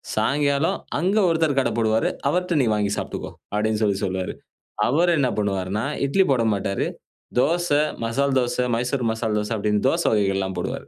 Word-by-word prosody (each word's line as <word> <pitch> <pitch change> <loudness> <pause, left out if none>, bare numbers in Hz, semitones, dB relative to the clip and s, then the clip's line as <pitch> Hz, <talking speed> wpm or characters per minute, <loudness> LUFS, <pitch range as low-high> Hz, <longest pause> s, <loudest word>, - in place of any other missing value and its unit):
சாயங்காலம் 140 +6 +1 0.2
அங்க 190 +5 +1
ஒருத்தர் 160 -4 +1
கடை - - +1
போடுவாரு. 110 0 +2 0.2
அவர்ட்ட 180 -2 0
நீ - - +1
வாங்கி 105 -1 0
சாப்ட்டுக்கோ." - - -5 0.2
அப்டின்னு 110 +1 0
சொல்லி 100 -2 +1
சொல்லுவாரு. 95 -1 -3 0.6
அவர் 170 +6 +3
என்ன 130 -3 +2
பண்ணுவாருனா, 100 +2 -1 0.2
இட்லி 190 +7 +3
போடமாட்டாரு. 105 -5 0 0.5
தோச, 175 +5 +2 0.4
மசால் 135 +4 0
தோச, 120 -1 -1 0.2
மைசூர் 125 0 -1
மசால் 110 -1 -1
தோச 105 +2 -4
அப்டின்னு, 105 +2 0
தோச 170 +3 0
வகைகள்லாம் 95 -2 0
போடுவார். - - -4
115 Hz, 150 wpm, -23 LUFS, 105-145 Hz, 0.6 s, அவர்